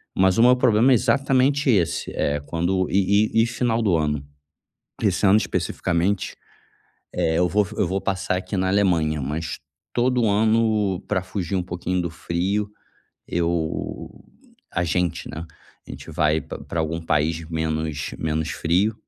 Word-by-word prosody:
Mas 95 +1 +3
o 115 - +5
meu 125 +1 +7
problema 125 +1 +4
é - - +7
exatamente 135 +4 +2
esse, 85 -5 0
eh, 75 0 0
quando 90 +4 0
e 100 +2 +3
e - - +5
e - - +2
final 115 -1 0
do 95 -6 +2
ano, 75 -2 -1 0.8
esse - - +2
ano 100 +2 +6
especificamente, 95 0 -1 0.8
eh, 80 -2 +1
eu 90 - +3
vou 105 +1 +2
eu 95 - +2
vou 95 +3 -1
passar 95 -1 -1
aqui 90 +2 -5
na 95 0 +1
Alemanha, 85 -6 +2
mas 75 +5 -4 0.3
todo 125 -1 +2
ano, 105 -2 +2
pra 95 -3 0
fugir 95 -1 -3
um 90 - 0
pouquinho 90 0 -2
do 85 - -2
frio, 95 +5 -2 0.6
eu 85 -2 -2 0.6
a 85 - 0
gente, 90 0 -1
né, 80 +2 -6 0.4
a - - -16
gente - - -9
vai 75 0 +2
pra - - -8
pra 85 - -4
algum 80 +1 -2
país 80 +1 0
menos 80 -2 -2
menos 80 0 -1
frio. 90 +8 +1
90 Hz, 155 wpm, -23 LUFS, 80-105 Hz, 0.8 s, meu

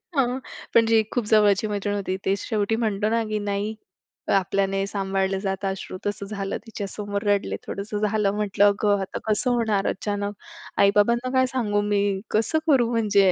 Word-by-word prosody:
हां, 265 -3 +3 0.5
पण 230 -1 +6
जी 225 -1 +4
खूप 245 -3 0
जवळची 210 -1 +4
मैत्रीण 205 0 -2
होती, 190 -2 -2
ते 195 - +2
शेवटी 215 -1 0
म्हणतो 210 0 0
ना, 230 0 +1
की 215 0 -1
नाही 205 +1 -2 0.6
आपल्याने 195 +1 0
सांभाळलं 195 -1 -1
जातं 195 0 -2
अश्रू 190 -1 -5
तसं 205 0 -2
झालं. 195 -1 -3
तिच्यासमोर 205 -1 -4
रडले 200 - +1
थोडंसं 205 +1 -4
झालं, 210 -2 +1
म्हटलं 205 -1 +2
अगं 205 0 +2
आता 190 - -4
कसं 230 +4 +1
होणार, 220 -5 +1
अचानक 205 +1 -3 0.5
आई-बाबांना 235 +5 +3
काय 260 - +5
सांगू 205 -4 +1
मी? 200 0 +3 0.3
कसं 270 +9 +1
करू 255 -6 +4
म्हणजे? 205 -4 +4
205 Hz, 160 wpm, -24 LUFS, 195-220 Hz, 0.6 s, पण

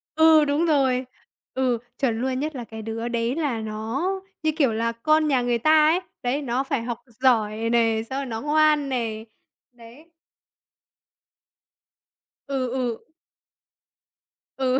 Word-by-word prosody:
Ừ, 315 -1 +6
đúng 290 +4 +1
rồi! 265 -5 +2 0.5
Ừ, 255 -2 +1 0.2
chuẩn 235 -4 0
luôn, 260 0 -1
nhất 305 0 -3
là 245 - -5
cái 220 -1 -9
đứa 225 +1 -4
đấy 235 +2 -1
là 285 -8 -1
nó, 220 +8 -3 0.4
như 315 - +2
kiểu, 270 -8 +3
là 230 +1 0
con 310 +6 +2
nhà 265 -4 +2
người 245 -1 +1
ta 310 +5 +5
ấy, 345 +3 +3 0.2
đấy, 265 +4 0
nó 255 0 -1
phải 265 -4 -2
học 240 -1 -4 0.2
giỏi 225 -3 +2
nè, 225 -2 +2
xong 265 +1 -2
rồi 280 - -3
nó 225 -3 -5
ngoan 300 -1 +3
nè, 225 -4 -2 0.5
đấy. 245 +7 -16 2.4
Ừ, 270 -2 -1
ừ. 245 -3 -3 1.5
Ừ, 260 -1 +1
255 Hz, 145 wpm, -24 LUFS, 230-290 Hz, 2.4 s, Ừ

